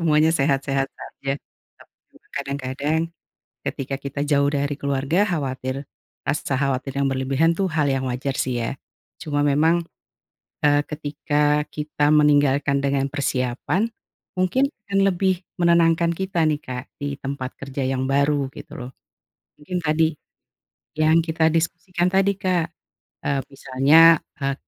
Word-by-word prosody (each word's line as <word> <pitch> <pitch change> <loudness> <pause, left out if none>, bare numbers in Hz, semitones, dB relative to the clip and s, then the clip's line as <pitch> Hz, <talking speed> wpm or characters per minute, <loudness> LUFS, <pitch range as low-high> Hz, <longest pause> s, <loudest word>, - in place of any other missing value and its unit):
semuanya 155 -1 +4
sehat-sehat 135 -2 +1
saja. 135 0 -5 0.5
Tapi - - -20 0.4
kadang-kadang 140 +2 -2 0.7
ketika 135 0 -3
kita 140 0 -5
jauh 140 -1 +3
dari 145 0 -1
keluarga, 140 +7 +1
khawatir 135 -5 -3 0.4
rasa 145 - -1
khawatir 135 -1 -1
yang 140 - +2
berlebihan 135 +4 +2
tuh 195 - +1
hal 150 -3 +2
yang 135 -1 0
wajar 130 +2 -2
sih 125 -2 -1
ya. 115 - -2 0.5
Cuma 145 -3 -1
memang, 155 +4 +3 0.8
eee, 145 0 +5
ketika 150 0 0
kita 150 -1 0
meninggalkan 145 -2 +4
dengan 140 0 +1
persiapan, 140 - -1 0.5
mungkin 255 +10 +2 0.2
akan 195 0 +1
lebih 185 0 0 0.2
menenangkan 170 -1 +4
kita 185 -3 0
nih 150 -1 +1
Kak 125 0 -6 0.2
di 140 -1 -3
tempat 135 -2 -4
kerja 135 0 -4
yang 130 0 0
baru 140 0 +2
gitu - - -10
loh. 125 +1 -7 0.7
Mungkin 180 +5 -3
tadi, 160 +1 +3 0.9
yang 155 +1 +4
kita 160 -1 +1
diskusikan 175 +2 0
tadi 195 +1 +3
Kak, 180 -3 +1 0.6
eee, 140 -1 +1
misalnya, 140 +5 +5 0.2
eee, 140 -1 -1
145 Hz, 130 wpm, -23 LUFS, 135-165 Hz, 0.9 s, eee